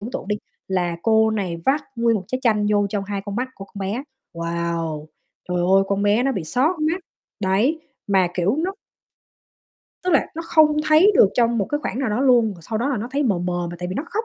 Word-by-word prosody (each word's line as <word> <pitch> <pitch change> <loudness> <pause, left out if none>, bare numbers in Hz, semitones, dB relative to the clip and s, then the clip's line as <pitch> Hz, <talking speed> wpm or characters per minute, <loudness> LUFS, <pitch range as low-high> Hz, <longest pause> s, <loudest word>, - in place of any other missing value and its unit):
tưởng 225 +5 -6
tượng - - -5
đi 210 - 0 0.3
là 175 -3 0
cô 220 -1 +4
này 190 -6 -2
vắt 285 +2 +3
nguyên 230 -1 +2
một 190 - -5
trái 255 - -2
chanh 210 -4 +2
vô 205 -1 +3
trong 200 -2 -2
hai 200 0 -3
con 205 0 -5
mắt 255 +1 -1
của 195 - -9
con 200 0 -11
bé, 205 +7 -2 0.3
wow! 170 -2 -3 0.4
Trời 180 - -1
ơi, 190 +2 +4
con 200 0 0
bé 205 +3 +3
nó 270 +1 +1
bị 180 -8 -3
xót 300 - 0
mắt 325 +4 0 0.4
đấy, 215 +12 +1 0.3
mà 190 -3 +3
kiểu 190 - +1
nó 375 +4 -1 1.3
Tức 365 - 0
là 290 - +3
nó 330 - -4
không 310 -2 +4
thấy 340 +7 +6
được 200 - +6
trong 235 -1 +2
một 200 - +1
cái 295 - -2
khoảng 250 - -3
nào 265 -5 0
đó 225 +5 0
luôn, 245 -4 +5
rồi 170 - -15
sau 220 +5 -3
đó 250 +5 0
là 270 - 0
nó 225 +4 -4
thấy 285 +2 0
mờ 205 -10 +1
mờ 175 0 -2
mà 175 - -7
tại 180 - -4
vì 185 - -4
nó 285 - -2
khóc 440 +2 -2
210 Hz, 245 wpm, -22 LUFS, 190-265 Hz, 1.3 s, thấy